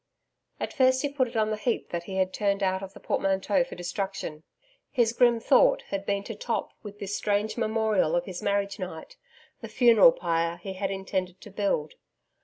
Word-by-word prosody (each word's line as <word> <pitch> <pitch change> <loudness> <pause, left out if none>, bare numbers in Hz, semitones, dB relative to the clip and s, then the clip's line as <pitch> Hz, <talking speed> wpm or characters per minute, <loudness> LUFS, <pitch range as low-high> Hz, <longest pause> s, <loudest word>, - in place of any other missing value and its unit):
At - - -4
first 260 0 +3
he 285 - 0
put 275 -2 0
it 235 - -12
on 215 0 +1
the - - 0
heap 235 +2 -2
that 170 0 -4
he 190 - -6
had 185 0 0
turned 200 -1 0
out 190 0 +1
of 195 0 -9
the - - -11
portmanteaux 195 +8 +1
for 265 - -9
destruction. 175 -3 -4 0.5
His 235 -4 +2
grim 240 -1 +4
thought - - +4
had 195 0 -4
been 200 0 0
to 225 - -6
top 225 +2 -3
with 205 -1 -10
this 205 -1 -4
strange 210 +1 0
memorial 220 -7 +1
of 175 0 0
his 185 -2 -6
marriage 200 0 -1
night, 180 -4 -7 0.4
the - - -7
funeral 245 - +6
pyre 170 - -1
he 190 +2 -7
had 190 +1 -2
intended 190 -1 -3
to 210 - -12
build. 195 -7 -1
200 Hz, 200 wpm, -27 LUFS, 190-225 Hz, 0.5 s, funeral